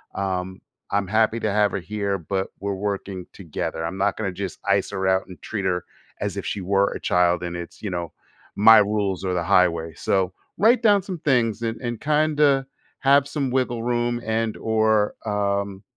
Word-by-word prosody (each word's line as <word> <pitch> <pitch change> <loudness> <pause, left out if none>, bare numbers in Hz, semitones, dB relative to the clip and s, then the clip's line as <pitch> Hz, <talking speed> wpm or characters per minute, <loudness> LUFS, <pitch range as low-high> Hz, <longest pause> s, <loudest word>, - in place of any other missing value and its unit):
Um, 95 -1 -3 0.3
I'm 100 -1 0
happy 110 +2 +2
to 110 - 0
have 105 0 +3
her 95 - -2
here, 100 +2 -2
but, 95 +3 -2
we're 100 0 -2
working 100 -2 -4
together 80 -2 -4
I'm 90 +3 -4
not 100 +1 +1
gonna 100 -4 -2
just 95 -1 -6
ice - - +1
her 95 0 -1
out 95 0 +1
and 90 - -12
treat 105 -3 -4
her 90 -2 0 0.4
as - - -2
if - - -4
she 100 - -3
were 100 +2 +2
a - - -5
child 90 0 +2
and 85 0 -4
it's, 85 0 -9
you 105 - -3
know, 85 -2 -4 0.4
my 110 +2 +8
rules 100 -2 +1
or 90 - 0
the 85 -1 0
highway 85 -3 +2
so, 95 +1 0 0.2
write 230 +3 +4
down 205 -3 +5
some 185 -2 -6
things 120 -7 +1
and 115 -1 -2
and 120 -3 -4
kinda 150 -2 +3 0.3
have 140 0 +4
some 140 -3 -2
wiggle 120 -3 0
room 120 0 0
and 110 0 -1
or, 110 -1 +2
um, 100 -1 -1
100 Hz, 190 wpm, -23 LUFS, 95-115 Hz, 0.4 s, my